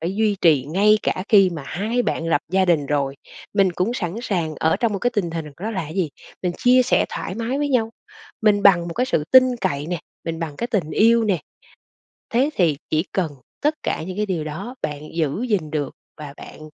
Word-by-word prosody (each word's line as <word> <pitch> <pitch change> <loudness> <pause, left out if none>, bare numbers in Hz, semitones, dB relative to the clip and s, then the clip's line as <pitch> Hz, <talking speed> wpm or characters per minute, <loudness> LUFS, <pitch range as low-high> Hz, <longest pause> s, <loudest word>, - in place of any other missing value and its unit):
phải 170 +4 -2
duy 215 -2 +2
trì 150 -7 +4
ngay 210 +5 +4
cả 185 - -1
khi 195 -4 +6
mà 160 -5 -6
hai 220 +7 -1
bạn 165 - -2
lập 145 -3 +2
gia 190 0 +4
đình 160 -5 +2
rồi, 140 -1 -1 0.4
mình 195 -3 +3
cũng 185 +7 0
sẵn 175 -7 -3
sàng 170 -9 -1
ở 160 - +3
trong 230 -3 0
một 195 - -1
cái 245 - +1
tình 195 -8 -1
hình 165 -2 -4 0.2
đó 220 - -2
là 190 -8 -3
gì? 165 -1 -1 0.3
Mình 180 - 0
chia 250 +1 +5
sẻ 250 - +2
thoải 185 - -5
mái 235 +4 -2
với 290 0 0
nhau, 230 -4 +1 0.5
mình 205 -2 +4
bằng 175 -4 +5
một 165 - -6
cái 250 +2 0
sự 155 - 0
tin 255 -1 +7
cậy 150 -6 -1
nè, 175 -2 -3 0.2
mình 165 -1 -3
bằng 160 -3 -5
cái 235 - -2
tình 190 -10 -1
yêu 230 +5 +4
nè. 195 -5 +1 0.9
Thế 260 +6 +2
thì 165 -6 +2
chỉ 155 +3 +1
cần 175 -6 -1 0.3
tất 300 +2 +2
cả - - -2
những 185 +3 -6
cái 210 0 0
điều 175 -6 -2
đó 190 - -6
bạn 150 -1 -3
giữ 165 - -1
gìn 180 -8 0
được 145 -3 -2 0.3
và 145 -2 -8
bạn, - - -12
185 Hz, 225 wpm, -22 LUFS, 160-220 Hz, 0.9 s, tin